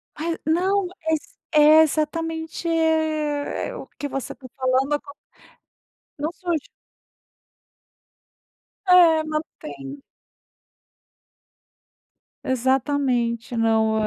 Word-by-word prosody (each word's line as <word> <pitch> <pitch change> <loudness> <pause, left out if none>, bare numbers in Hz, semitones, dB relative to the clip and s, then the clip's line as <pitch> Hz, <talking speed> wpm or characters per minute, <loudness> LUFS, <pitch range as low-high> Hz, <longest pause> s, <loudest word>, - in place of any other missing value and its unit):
Mai, 330 +2 -3
não 370 +4 +1 0.2
exa 315 -2 -2
é, 305 +1 +7
exatamente, 320 +2 -1
eh, 315 +2 0
o - - -8
que 290 - -3
você 270 -1 -5
tá 265 - -16
falando 260 +2 +1
acon 285 -1 -4 1.0
Não 305 +3 -2
surge. 345 -4 -3 2.2
É, 340 -4 +6
não 310 0 -2 0.2
tem. 140 -1 -9 2.4
Exatamente, 255 -2 0
não 220 -1 +2
300 Hz, 80 wpm, -23 LUFS, 260-320 Hz, 2.4 s, é